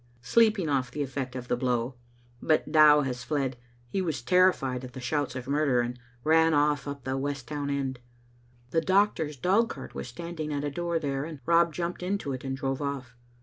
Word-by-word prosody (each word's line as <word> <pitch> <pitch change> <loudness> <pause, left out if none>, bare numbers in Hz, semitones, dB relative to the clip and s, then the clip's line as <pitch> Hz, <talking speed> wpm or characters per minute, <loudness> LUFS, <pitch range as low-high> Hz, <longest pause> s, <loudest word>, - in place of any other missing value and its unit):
" - - -32
Sleeping 215 -6 +4
off 135 -3 0
the 145 - -3
effect 130 -1 -4
of 125 -1 -6
the - - +1
blow: 125 0 0 0.5
but 155 -1 +1
Dow 150 -1 +7
has 125 -3 -3
fled. 135 0 -1 0.3
He 190 +10 -1
was 160 -8 -2
terrified 135 -8 +3
at 125 -1 -9
the 130 - -7
shouts 140 +3 -1
of 130 -1 -6
murder, 140 -3 +2
and 120 +1 -4 0.2
ran 160 +1 +4
off 145 -2 +2
up 140 -2 -6
the 130 +1 -2
West 140 -2 -3
Town 145 0 -3
end. 135 -2 -2 0.7
The 165 - +2
doctor's 185 -5 +2
dogcart 185 - 0
was - - -5
standing 160 +3 -5
at 145 -1 -2
a 145 - -2
door 170 +2 -1
there 140 -3 -2
and 155 -3 -8
Rob 170 0 +4
jumped 170 +2 -3
into 180 -6 -2
it 130 - -6
and 135 -1 -3
drove 135 +1 -2
off. 135 -4 -4
145 Hz, 200 wpm, -28 LUFS, 130-160 Hz, 0.7 s, Dow